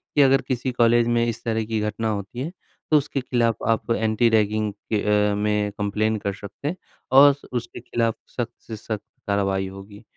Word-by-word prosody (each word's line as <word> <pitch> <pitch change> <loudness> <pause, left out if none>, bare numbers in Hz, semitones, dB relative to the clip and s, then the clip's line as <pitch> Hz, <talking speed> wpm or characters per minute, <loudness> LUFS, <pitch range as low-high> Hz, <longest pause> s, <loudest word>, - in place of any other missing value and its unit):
कि, 145 - +6
अगर 135 0 +5
किसी 130 0 -1
कॉलेज 120 -1 +3
में 120 0 +2
इस 115 -1 -4
तरह 110 -1 -1
की 110 0 -1
घटना 105 +1 -2
होती 100 +2 -4
है 145 +6 -3 0.4
तो 155 - +7
उसके 145 -1 -1
ख़िलाफ़ 120 -3 0
आप 115 +1 0
एंटी-रैगिंग 110 -1 +2 0.2
के 105 -2 +1 0.3
अ, - - 0
में 105 0 0
कंप्लेन 110 +2 0
कर 100 -1 -3
सकते 100 +7 -8
हैं। 165 - -1 0.4
और 140 +2 +8
स 140 - -16
उसके 120 -1 -4
ख़िलाफ़ 115 -1 -1 0.2
सख्त 120 -1 -2
से 110 - -5
सख्त 110 0 -5 0.3
कार्रवाई 95 -1 0
होगी। 100 +2 -11
110 Hz, 190 wpm, -23 LUFS, 105-120 Hz, 0.4 s, और